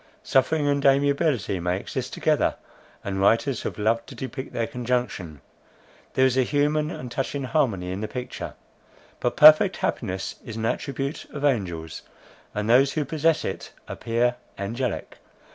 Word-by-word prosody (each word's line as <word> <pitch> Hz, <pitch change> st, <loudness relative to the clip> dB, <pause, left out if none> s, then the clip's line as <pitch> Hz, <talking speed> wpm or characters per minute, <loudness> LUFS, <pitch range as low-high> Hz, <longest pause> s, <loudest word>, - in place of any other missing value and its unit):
Suffering 145 Hz, +3 st, +2 dB
and 140 Hz, -1 st, +1 dB
amiability 140 Hz, -, +2 dB
may 90 Hz, +1 st, 0 dB
exist -, -, -5 dB
together, -, -, +1 dB, 0.5 s
and 95 Hz, -1 st, -2 dB
writers 115 Hz, +5 st, +2 dB
have -, -, -4 dB
loved 115 Hz, +2 st, +1 dB
to -, -, -10 dB
depict 130 Hz, +1 st, -6 dB
their 115 Hz, -, -1 dB
conjunction; 120 Hz, -, -3 dB, 0.7 s
there 130 Hz, -, +5 dB
is 130 Hz, -1 st, +2 dB
a 130 Hz, -, +4 dB
human 150 Hz, +3 st, +1 dB
and 125 Hz, -7 st, -7 dB
touching 135 Hz, +2 st, -2 dB
harmony 120 Hz, -, 0 dB
in 95 Hz, +2 st, -4 dB
the 110 Hz, -, -2 dB
picture. 125 Hz, +2 st, -6 dB, 0.6 s
But 120 Hz, -, -1 dB
perfect 155 Hz, +5 st, +8 dB
happiness 95 Hz, -4 st, -3 dB
is 115 Hz, -, -7 dB
an 110 Hz, 0 st, -3 dB
attribute 140 Hz, +4 st, -3 dB
of 145 Hz, 0 st, -3 dB
angels; 85 Hz, -, -1 dB, 0.5 s
and 105 Hz, 0 st, -1 dB
those 130 Hz, +4 st, +5 dB
who 150 Hz, -2 st, -1 dB
possess 160 Hz, +2 st, +1 dB
it, -, -, -5 dB
appear 120 Hz, +1 st, 0 dB, 0.2 s
angelic. 115 Hz, +4 st, -3 dB
125 Hz, 150 wpm, -25 LUFS, 110-140 Hz, 0.7 s, perfect